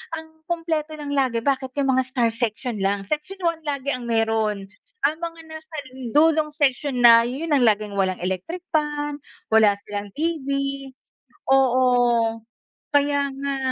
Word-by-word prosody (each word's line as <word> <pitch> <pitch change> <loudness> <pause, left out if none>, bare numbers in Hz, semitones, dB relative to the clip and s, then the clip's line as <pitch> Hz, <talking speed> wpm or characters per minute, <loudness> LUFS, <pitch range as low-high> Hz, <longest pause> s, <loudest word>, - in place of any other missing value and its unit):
ang 320 0 -12
kumpleto 320 -2 -2
lang 290 -1 -5
lagi 260 -4 +1
bakit 265 -2 0
'yong 270 -1 +2
mga 260 - +3
star 245 -3 +1
section 230 -1 -3
lang. 195 0 0
Section 305 - -4
1 335 -1 0
lagi 280 -1 -2
ang 245 -1 -7
meron. 220 -3 0 0.4
Ang 300 +2 +3
mga 330 -1 -5
nasa 315 0 -10 0.4
dulong 310 0 +4
section 280 -2 0
na, 230 -1 +8
'yon 295 +4 -1
ang 260 - +3
laging 210 -1 +1
walang 190 -1 0
electric 190 - -3 0.2
fan, 295 -1 -1 0.3
wala 215 -2 +6
silang 205 -1 -5
TV. 310 -3 -2 1.0
Oo, 245 -3 +3 0.5
kaya 285 -1 +2
nga. 280 0 -2
270 Hz, 145 wpm, -23 LUFS, 230-300 Hz, 1.0 s, na